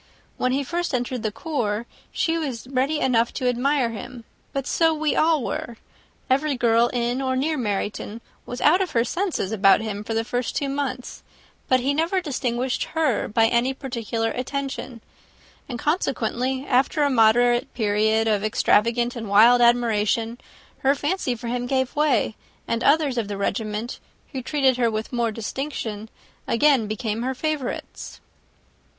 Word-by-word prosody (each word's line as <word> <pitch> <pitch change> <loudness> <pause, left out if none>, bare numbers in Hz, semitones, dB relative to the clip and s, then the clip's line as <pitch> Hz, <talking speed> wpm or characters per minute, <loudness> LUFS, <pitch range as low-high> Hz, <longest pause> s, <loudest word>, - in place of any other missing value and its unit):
When 255 - +1
first 345 +3 -3
he - - +3
entered 245 0 -3
the 215 - -1
corps, 230 -5 -2 0.3
she 325 - 0
was 270 -8 -4
ready 275 +4 0
enough 235 -4 +2
to 255 - -2
admire 250 0 +1
him; 230 +2 -8 0.3
but 275 -1 -3
so 325 +1 +2
we 305 -1 0
all 315 -4 +3
were. 230 0 -4 0.5
Every 275 +1 +1
girl 235 0 +3
in 240 +1 -1
or 260 -1 0
near 300 +5 0
Meryton 210 -2 -3 0.2
was 245 - -7
out 350 +6 +5
of 370 - -2
her 230 - +3
senses 345 - -2
about 200 -2 +5
him 210 -2 -4
for 225 +1 -4
the 225 - +1
first 245 +1 -3
two 280 - -1
months: 275 -2 -4 0.5
but 255 -1 +3
he 275 +3 +1
never 330 +6 +1
distinguished 255 -5 -2
her 305 -9 +1
by 225 +1 +3
any 240 +3 +1
particular 230 -4 -3
attention; 260 -2 -4 0.7
and, 245 - -4
consequently, 260 - -1
after 275 +5 +2
a 285 - +3
moderate 240 +2 +4
period 220 0 +2
of 210 -2 +1
extravagant 235 +3 +2
and 225 -3 -6
wild 230 +5 +6
admiration, 235 0 +2 0.4
her 275 +1 +3
fancy 290 -3 -1
for 235 +1 -7
him 245 +1 -2
gave 260 0 0
way, 295 -7 +2 0.3
and 230 0 -1
others 285 -4 +3
of 220 - -2
the 205 -1 -4
regiment, 215 +3 -3 0.3
who 265 -3 -4
treated 265 -1 +2
her 240 -2 +2
with 220 +2 -4
more 235 -2 +1
distinction, 225 -2 -5 0.4
again 265 -2 +3
became 215 +1 -3
her 260 +2 -2
favourites." 300 -2 -4
245 Hz, 160 wpm, -23 LUFS, 225-275 Hz, 0.7 s, wild